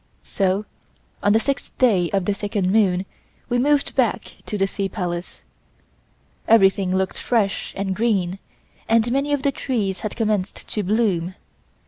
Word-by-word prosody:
So 195 +1 0 0.6
on 205 - +3
the 220 - +5
sixth 275 +4 -3
day 195 -9 +3
of 195 -2 0
the 205 - +1
second 200 -2 -1
moon 195 -3 +3 0.4
we 245 0 +1
moved 285 +2 +2
back - - 0
to 210 - -2
the 195 - +2
Sea 195 0 -3
Palace. 175 -3 -5 1.0
Everything 195 -4 +4
looked 190 0 -1
fresh 215 -5 0
and 195 -1 -1
green 195 -5 0 0.5
and 230 +1 +3
many 275 +3 0
of 285 -1 0
the 280 - +2
trees 215 -9 -2
had 215 - -4
commenced 210 -4 -1
to 210 - -1
blossom. 190 -4 0
205 Hz, 150 wpm, -22 LUFS, 190-230 Hz, 1.0 s, the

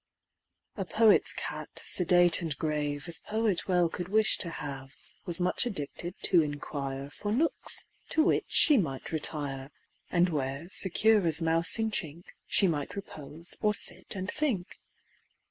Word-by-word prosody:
A 195 - -2
poet's 215 +4 +3
cat, - - -4
sedate 175 -1 +4
and 160 -4 -4
grave 150 -2 -3
As 170 -1 -1
poet 215 -4 -2
well 180 -2 +2
could 175 +1 -6
wish 215 +1 +2
to 170 - -1
have, 135 -3 -7 0.3
Was 175 0 0
much 180 +7 +2
addicted 175 -2 -5
to 175 -3 +4
inquire 140 -2 -5
For 205 +6 -5
nooks 295 +9 -1 0.2
to 315 - +2
which - - +1
she 300 -3 +5
might 135 -8 -4
retire, 145 -4 -1 0.4
And 175 +1 +2
where, 140 0 -4
secure 210 +3 +4
as 160 0 +3
mouse 165 +3 +5
in 220 -1 -1
chink, 170 -3 -6 0.2
She 195 - +3
might 150 -5 -3
repose, 165 -4 -7
or 210 -1 +1
sit - - 0
and 190 -1 -5
think. 250 -12 -3
170 Hz, 150 wpm, -28 LUFS, 145-200 Hz, 0.4 s, she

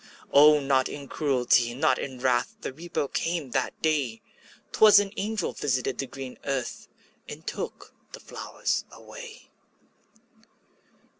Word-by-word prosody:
O, 150 +1 +7
not 135 -2 +2
in 140 -1 -7
cruelty, 125 -5 +2
not 155 +4 +2
in 130 -2 -5
wrath, 125 -1 +1
The - - -5
Reaper 165 -1 -3
came 165 -3 -2
that 130 0 -1
day; 140 -8 0 0.5
'Twas 215 -1 +7
an 200 -1 +3
angel 210 -2 -2
visited 130 -3 -1
the 135 - -2
green 130 -1 -8
earth, 135 -3 -3 0.4
And - - -9
took - - -6 0.2
the - - -9
flowers - - -3
away. - - -12
140 Hz, 130 wpm, -27 LUFS, 130-155 Hz, 0.5 s, O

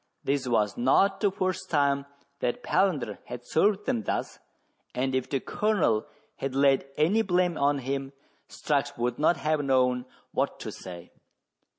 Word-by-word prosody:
This 140 -1 0
was 110 -4 +1
not 195 +11 +3
the 205 - +3
first 185 -1 -2
time 140 -2 +2 0.3
that 120 - -2
Palander 185 -8 +1
had 120 0 -8
served 200 +8 +2
them 115 - 0
thus, - - -3 0.6
and 130 +1 0
if 130 -1 -1
the 135 - 0
Colonel 165 - +1 0.3
had 135 -1 -3
laid 135 -1 +3
any 180 +9 +3
blame 180 -3 +1
on 140 0 +2
him, 135 +1 -3 0.4
Strux 145 -1 -1
would 120 0 -1
not 155 +2 +3
have 150 +1 0
known 125 -2 +2 0.3
what - - -1
to - - -5
say. 90 -2 -10
140 Hz, 155 wpm, -27 LUFS, 125-175 Hz, 0.6 s, not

